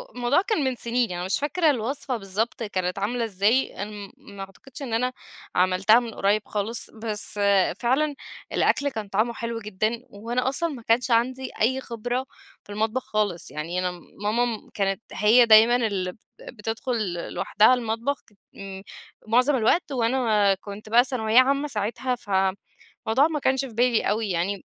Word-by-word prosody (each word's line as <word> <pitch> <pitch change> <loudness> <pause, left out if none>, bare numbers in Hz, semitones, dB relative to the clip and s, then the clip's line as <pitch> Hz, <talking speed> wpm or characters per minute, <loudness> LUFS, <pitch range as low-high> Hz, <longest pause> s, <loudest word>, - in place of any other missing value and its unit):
الموضوع 250 +7 +2
كان 420 -8 -1
من 260 -1 0
سنين 235 -1 -1
يعني 175 0 -4
مش 190 - 0
فاكرة 315 +3 +1
الوصفة 255 0 -2
بالضبط 210 +4 -3
كانت 185 -3 -2
عاملة 235 +4 -1
إزاي، 210 +3 +1
أنا 210 - -7
م 205 -1 -9
ما 200 -1 -14
أعتقدش 245 +8 -13
إن 245 -5 -5
أنا 250 +2 0 0.4
عملتها 185 +5 +4
من 235 -2 -6
قريّب 205 +2 +1
خالص، 215 +3 -3
بس 215 -2 -1 0.4
فعلًا 280 +5 +1 0.4
الأكل 285 0 +2
كان 220 -6 -6
طعمُه 215 +4 0
حلو 230 0 -4
جدًا، 215 +3 -2
وأنا 240 +5 -2
أصلًا 335 +5 -1
ما 260 -6 -7
كانش 235 +2 +1
عندي 255 +3 +1
أي 260 +4 +2
خبرة 245 +2 -3 0.4
في 205 - -13
المطبخ 220 +4 -1
خالص، 210 -5 -2
يعني 165 +4 -3
أنا 180 -1 -1 0.3
ماما 230 +1 -1
كانت 195 0 -1
هي 235 +3 +5
دايمًا 225 +2 +7
اللي 200 -6 -1 0.3
بتدخل 225 -2 -3 0.2
لوحدها 215 +5 +4
المطبخ 235 +3 -2 0.3
م 195 -1 -8 0.5
معظم 250 +5 +3
الوقت 270 +7 +1
وأنا 230 -5 +2
كنت 200 +2 -9
بقى 240 +2 +6
ثانوية 235 -3 +3
عامّة 275 +3 +2
ساعتها، 235 +3 -2
فالموضوع 205 +5 -1
ما 300 - -1
كانش 265 0 +1
في 245 - -10
بالي 240 0 +2
أوي 215 0 -1
يعني. 185 +3 -2
225 Hz, 155 wpm, -25 LUFS, 205-250 Hz, 0.5 s, دايمًا